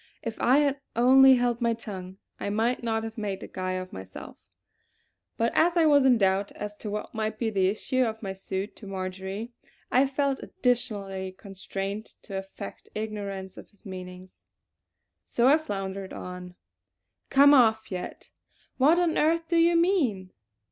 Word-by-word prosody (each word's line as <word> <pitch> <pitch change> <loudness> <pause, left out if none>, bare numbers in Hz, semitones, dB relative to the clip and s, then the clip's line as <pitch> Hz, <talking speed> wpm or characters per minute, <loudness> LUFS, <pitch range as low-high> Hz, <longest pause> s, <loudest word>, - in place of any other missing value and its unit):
If 225 -1 -5
I 255 +3 +5
had 285 -1 +2 0.2
only 260 +3 +7
held 245 -1 0
my 235 -1 +2
tongue 190 -4 -8 0.2
I - - -3
might 225 +4 0
not 225 -1 -1
have 225 0 -6
made 200 -3 -3
a - - -7
guy 185 0 -3
of 185 0 -5
myself; 95 0 -9 1.0
but 230 +1 +1
as 345 +2 +3
I 330 - +5
was 285 -3 +5
in 250 -2 +6
doubt 195 -1 +1
as 210 0 -6
to 210 - -6
what 210 +1 -5
might 215 0 -2
be 225 -1 -1
the 190 -3 +2
issue 220 +6 -1
of 220 -1 -3
my 195 -1 -3
suit 190 +1 -5
to 205 - -11
Marjory, 190 +3 -5 0.4
I 265 +2 +4
felt 275 0 -1
additionally 200 -6 -2
constrained 195 +1 -5 0.2
to 195 - -8
affect 195 +1 -8
ignorance 200 -3 -5
of - - -13
his 205 - -22
meaning. 185 -1 -8 0.9
So 235 - 0
I 295 +4 +6
floundered 195 -8 -5
on: 180 0 -8 0.7
"'Come 285 +1 +7
off 220 -5 +4
yet'? 180 -1 -6 0.5
What 300 +6 +5
on 350 -2 +2
earth 330 +1 +1
do 340 - +2
you 335 +1 +5
mean?" 285 - +1
215 Hz, 165 wpm, -27 LUFS, 190-255 Hz, 1.0 s, only